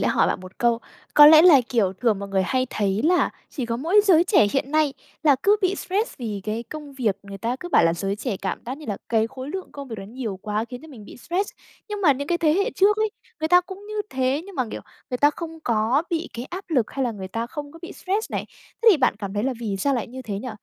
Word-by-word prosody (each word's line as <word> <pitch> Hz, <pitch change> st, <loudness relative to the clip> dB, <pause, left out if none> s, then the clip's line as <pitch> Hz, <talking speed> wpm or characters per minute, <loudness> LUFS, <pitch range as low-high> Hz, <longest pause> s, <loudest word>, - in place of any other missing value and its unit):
lẽ -, -, +1 dB
hỏi -, -, +3 dB
bạn -, -, -1 dB
1 185 Hz, 0 st, -13 dB
câu. 235 Hz, -1 st, +2 dB, 0.4 s
Có 295 Hz, 0 st, +10 dB
lẽ 315 Hz, +1 st, +9 dB
là, 315 Hz, -7 st, +8 dB
kiểu, 205 Hz, -6 st, +1 dB
thường 215 Hz, 0 st, 0 dB
mọi 200 Hz, 0 st, -6 dB
người 190 Hz, -1 st, +1 dB
hay 255 Hz, +6 st, 0 dB
thấy 200 Hz, -1 st, 0 dB
là 355 Hz, +2 st, +3 dB, 0.2 s
chỉ 255 Hz, -5 st, -4 dB
có 230 Hz, 0 st, -2 dB
mỗi 340 Hz, -, +4 dB
giới 350 Hz, -4 st, +5 dB
trẻ 355 Hz, -, +4 dB
hiện 270 Hz, 0 st, -1 dB
nay 310 Hz, -2 st, +2 dB, 0.3 s
là 290 Hz, -4 st, +5 dB
cứ 410 Hz, +1 st, +5 dB
bị 375 Hz, +1 st, +2 dB
stress 410 Hz, +5 st, -2 dB
vì 215 Hz, -5 st, -4 dB
cái 220 Hz, +2 st, -2 dB
công 295 Hz, +1 st, -9 dB
việc, 230 Hz, -7 st, 0 dB
người 200 Hz, 0 st, -9 dB
ta 235 Hz, +5 st, -2 dB
cứ 350 Hz, -, -6 dB
bảo 170 Hz, -, +4 dB
là 165 Hz, -, +3 dB
giới 195 Hz, +3 st, -2 dB
trẻ 220 Hz, -2 st, -3 dB
cảm 190 Hz, 0 st, -3 dB
giác 260 Hz, +4 st, -5 dB
như 305 Hz, -, -11 dB
là 205 Hz, -2 st, -2 dB
cái 225 Hz, -1 st, +2 dB
khối 260 Hz, +3 st, -8 dB
lượng 380 Hz, +2 st, -6 dB
công 280 Hz, -2 st, -8 dB
việc 225 Hz, -, -6 dB
đó 195 Hz, -, -7 dB
nhiều 225 Hz, -5 st, -5 dB
quá 210 Hz, +1 st, -1 dB
khiến 250 Hz, +3 st, -9 dB
cho 320 Hz, -, -12 dB
mình 230 Hz, -8 st, -12 dB
bị -, -, -12 dB
stress. 360 Hz, +10 st, -2 dB, 0.4 s
Nhưng 415 Hz, -1 st, -4 dB
mà 320 Hz, -8 st, +5 dB
những 285 Hz, +3 st, -5 dB
cái 345 Hz, 0 st, +1 dB
thế 310 Hz, -3 st, +3 dB
hệ 400 Hz, +2 st, +1 dB
trước 410 Hz, +2 st, +4 dB
ấy, 435 Hz, -1 st, +1 dB, 0.3 s
người 315 Hz, -, 0 dB
ta 355 Hz, +1 st, +7 dB
cũng 380 Hz, +3 st, -11 dB
như 425 Hz, -, -6 dB, 0.2 s
thế, 265 Hz, +3 st, 0 dB
nhưng 395 Hz, -, -11 dB
mà, 255 Hz, -, 0 dB
kiểu, -, -, -5 dB, 0.3 s
người 250 Hz, -, -2 dB
ta 290 Hz, -, +5 dB
không 325 Hz, +1 st, -8 dB
có 235 Hz, +5 st, +2 dB
bị 335 Hz, 0 st, -2 dB
cái 235 Hz, -, -5 dB
áp 365 Hz, +7 st, -7 dB
lực, 255 Hz, -9 st, +1 dB
hay 270 Hz, -1 st, -2 dB
là 235 Hz, -, -1 dB
người 190 Hz, -2 st, -7 dB
ta 230 Hz, +4 st, -3 dB
không 290 Hz, +1 st, -7 dB
có 330 Hz, -, -12 dB
bị 345 Hz, -, -7 dB
stress 400 Hz, +4 st, -2 dB
này. -, -, -2 dB, 0.4 s
Thế 460 Hz, -, +7 dB
thì 365 Hz, -, +5 dB
bạn 255 Hz, -6 st, +2 dB
cảm 200 Hz, -2 st, -5 dB
thấy 205 Hz, -, 0 dB
là 265 Hz, +2 st, 0 dB
vì 205 Hz, -4 st, -2 dB
sao 275 Hz, +9 st, +1 dB
lại 240 Hz, -, -2 dB
như 260 Hz, +2 st, -9 dB
thế 210 Hz, -5 st, -5 dB
nhỉ? 255 Hz, +3 st, -6 dB
260 Hz, 290 wpm, -23 LUFS, 220-330 Hz, 0.4 s, Có